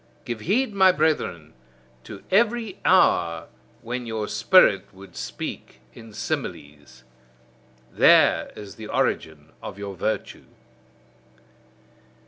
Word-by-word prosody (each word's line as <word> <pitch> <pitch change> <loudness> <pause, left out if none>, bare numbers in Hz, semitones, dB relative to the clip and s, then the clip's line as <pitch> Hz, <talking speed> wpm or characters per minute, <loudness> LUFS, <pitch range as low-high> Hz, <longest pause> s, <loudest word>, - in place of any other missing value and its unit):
Give 120 -2 -4
heed, 215 - 0
my 190 -1 +5
brethren, 150 - -1 0.5
to 100 - -10
every 225 -1 +1
hour 85 - +2 0.3
when 120 +1 -5
your 110 -2 -3
spirit 105 - +3
would 95 -2 -15
speak 65 - -7
in 115 -1 -13
similes: 75 - -6 0.9
there - - +4
is 100 -2 -11
the 110 - -8
origin 80 -5 -2
of - - -8
your 100 -1 -6
virtue. 110 +5 -4
110 Hz, 105 wpm, -23 LUFS, -, 0.9 s, my